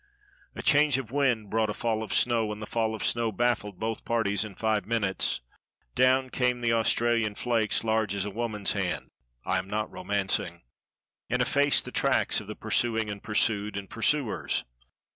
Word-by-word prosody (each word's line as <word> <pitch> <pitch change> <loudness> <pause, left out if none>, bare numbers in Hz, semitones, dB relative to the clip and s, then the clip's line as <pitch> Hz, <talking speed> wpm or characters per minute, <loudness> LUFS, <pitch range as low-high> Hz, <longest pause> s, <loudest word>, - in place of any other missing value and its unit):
A - - -6
change 145 -2 +4
of 125 -4 -6
wind 125 -7 0
brought 110 -1 +1
a 105 - -3
fall 110 -2 -1
of 110 - -6
snow, 115 -3 +2
and 105 - -6
the 110 - -5
fall 110 0 -1
of 110 - -4
snow 115 -1 +1
baffled 105 -3 -1
both 110 0 -3
parties 110 -3 +1
in 105 -3 -8
five 110 -1 0
minutes. 100 - 0 0.5
Down 130 0 +3
came 125 -1 +1
the 115 -1 +2
Australian 115 -1 +2
flakes 115 -2 0
large 110 -3 0
as 100 0 -1
a 105 - -4
woman's 105 -2 -1
hand - - -3 0.3
(I - - +1
am 95 - -7
not 105 +1 -2
romancing), 95 -4 -1 0.7
and 125 - 0
effaced 140 +3 +3
the - - -7
tracks - - +1
of - - -12
the - - -6
pursuing 115 -3 0
and 100 -1 -7
pursued 105 -1 0
and 100 -1 -6
pursuers. 120 +1 0
110 Hz, 180 wpm, -27 LUFS, 105-120 Hz, 0.7 s, change